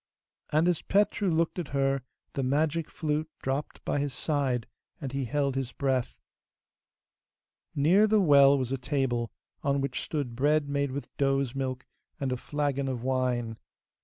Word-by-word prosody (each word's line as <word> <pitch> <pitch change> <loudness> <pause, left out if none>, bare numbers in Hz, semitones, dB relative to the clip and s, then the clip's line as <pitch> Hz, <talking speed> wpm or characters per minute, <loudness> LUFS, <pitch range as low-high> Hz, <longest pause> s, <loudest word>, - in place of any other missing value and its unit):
And 155 +3 +3
as 175 -3 +2
Petru 205 0 +2
looked 165 +2 +1
at 170 - -3
her 135 0 +2 0.3
the 135 - -1
magic 150 +4 +1
flute 155 0 -2
dropped 135 +3 -3
by 145 - 0
his 140 -1 -2
side, 135 -6 0 0.3
and 135 -4 -4
he 135 0 -2
held 140 +2 0
his 135 -2 -2
breath. 130 -2 -1 1.6
Near 180 +9 +5
the 215 0 +4
well 140 -5 +7
was 130 -2 -2
a 135 - -1
table, 125 -3 -1 0.3
on 140 0 +1
which 135 -2 -2
stood 140 -7 -3
bread 145 +3 +2
made 140 0 0
with 140 +2 -6
does' 135 -2 +1
milk, 130 -2 -3 0.3
and 135 -2 -1
a 125 - 0
flagon 140 0 -1
of 125 -3 -3
wine. 125 -3 0
140 Hz, 160 wpm, -29 LUFS, 130-150 Hz, 1.6 s, well